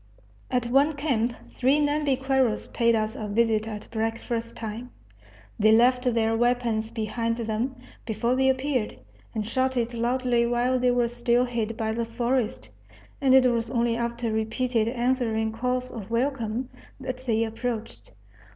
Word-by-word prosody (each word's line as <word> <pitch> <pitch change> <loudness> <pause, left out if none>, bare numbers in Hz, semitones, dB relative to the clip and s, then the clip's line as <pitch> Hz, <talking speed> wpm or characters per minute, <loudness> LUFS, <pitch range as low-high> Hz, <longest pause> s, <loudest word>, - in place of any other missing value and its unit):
At 250 -2 0
one 275 +6 +3
camp 250 -5 0 0.2
three 265 +4 +2
Nhambiquaras 270 -5 +1
paid 235 -1 +3
us 215 0 0
a 215 - -4
visit 220 0 +1
at 210 -2 -6
breakfast 230 +1 -3
time. 225 +3 -6 0.7
They 215 +1 +5
left 250 +3 +4
their 225 -1 +1
weapons 235 -2 +1
behind 230 +1 -2
them 230 +3 -2 0.3
before 235 +3 0
they 265 0 +3
appeared, 260 -3 0 0.4
and 215 -1 -1
shouted 250 0 0
loudly 240 0 +1
while 245 +2 +1
they 250 0 +3
were 245 -1 +2
still 240 +1 +1
hid 230 -2 -3
by 220 -1 -1
the 230 +1 -1
forest, 230 - -1 0.5
and 265 -1 +5
it 260 -1 +6
was 235 -2 +1
only 235 -2 +1
after 235 0 -2
repeated 225 +1 0
answering 235 -2 0
calls 250 +2 -2
of 215 -3 -7
welcome 240 0 -1 0.3
that 255 0 -5
they 230 -3 0
approached. 225 0 -4
235 Hz, 145 wpm, -26 LUFS, 225-255 Hz, 0.7 s, it